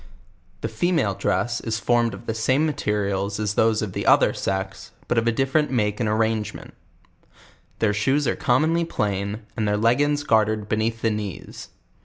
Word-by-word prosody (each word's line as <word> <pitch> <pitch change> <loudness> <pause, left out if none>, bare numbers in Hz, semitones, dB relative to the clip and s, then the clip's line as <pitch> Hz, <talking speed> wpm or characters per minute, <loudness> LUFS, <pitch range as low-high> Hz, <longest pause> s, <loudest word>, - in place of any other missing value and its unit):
The - - -1
female 115 - 0
dress 120 +5 -1
is 110 -1 -2
formed 120 +2 +1
of - - -13
the 115 - -2
same 130 +7 +1
materials 100 -7 -1
as 105 -1 -1
these 110 0 +2
of 100 -4 -5
the - - -3
other - - +5
sex, 95 0 -3 0.2
but 120 - +2
of 115 - -2
a - - +4
different 135 +5 +1
make 105 -5 0
and 110 -3 0
arrangement: 110 0 -1 1.0
Their 105 -2 +1
shoes 135 +7 +1
are 120 - +1
commonly 160 +7 +2
plain, 105 - -2
and 110 -2 -1
their 105 0 +1
leggins 145 +7 +2
gartered 110 -2 +1
hcr.ea.th 110 +1 -1
the 115 - +1
knees. 105 -4 -6
110 Hz, 170 wpm, -23 LUFS, 105-120 Hz, 1.0 s, other